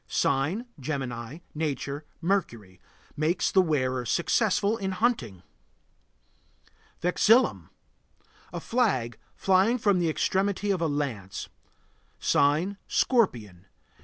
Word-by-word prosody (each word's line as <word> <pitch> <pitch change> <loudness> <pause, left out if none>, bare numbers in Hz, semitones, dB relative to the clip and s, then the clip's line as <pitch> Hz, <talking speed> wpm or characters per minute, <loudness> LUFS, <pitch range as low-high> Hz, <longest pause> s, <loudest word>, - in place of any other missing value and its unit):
Sign: 155 - 0
Gemini. 130 0 -5
Nature: 145 -1 -3 0.2
Mercury. 115 - -2 0.3
Makes 160 +4 0
the 190 - +5
wearer 130 -7 0
successful 200 - +1
in 190 -3 -3
hunting. 160 - -1 1.6
VEXILLUM. 220 +8 +3 0.8
A - - -4
flag 185 - 0 0.2
flying 195 +6 +3
from 205 -5 +2
the 170 -2 +1
extremity 195 +5 0
of 185 -3 -1
a 165 - +2
lance. 130 -11 -4 0.7
Sign: 155 +8 +2
Scorpion. 110 - 0
160 Hz, 95 wpm, -27 LUFS, 130-200 Hz, 1.6 s, the